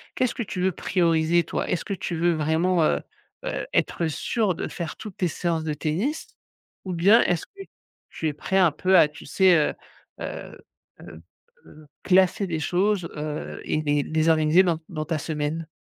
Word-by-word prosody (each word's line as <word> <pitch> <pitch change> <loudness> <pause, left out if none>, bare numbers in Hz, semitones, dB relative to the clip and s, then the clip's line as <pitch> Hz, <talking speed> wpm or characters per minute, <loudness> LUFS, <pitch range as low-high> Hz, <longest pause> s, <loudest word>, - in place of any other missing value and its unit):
qu'est-ce 255 -2 0
que 235 - -2
tu 185 -3 -5
veux 190 0 +2
prioriser 170 -1 +2
toi? - - -3
Est-ce 180 - -1
que 200 - -4
tu 175 -2 -4
veux 170 +1 +2
vraiment, 160 +3 +1
heu 70 - +1 0.4
heu, - - -3
être 170 - +1
sûr 190 +4 -1
de - - -4
faire 170 -4 -5
toutes 210 -4 -10
tes 180 - +1
séances 165 0 -2
de 155 - -1
tennis? 195 - -2 0.6
Ou 185 - -3
bien, 195 +7 +5
est-ce 175 -2 0
que 395 - -13 0.5
tu 160 - -3
es 150 - -1
prêt 190 +6 -2
un 180 -5 +5
peu 185 +5 +3
à, 160 - +7
tu 150 +1 -13
sais? 185 +4 +4
Heu 150 - +1 0.5
heu - - -7 0.4
heu - - -12 0.4
heu, 155 -1 -16 0.2
classer 190 +1 +3
des 165 -3 -2
choses, 180 +2 0
heu 150 0 -5
et 155 - 0
les 145 -1 +1
les 160 +2 +1
organiser 160 +3 +5
dans 170 -3 0
dans 155 0 -4
ta 160 -1 -1
semaine? 155 +1 -3
170 Hz, 190 wpm, -24 LUFS, 155-185 Hz, 0.6 s, à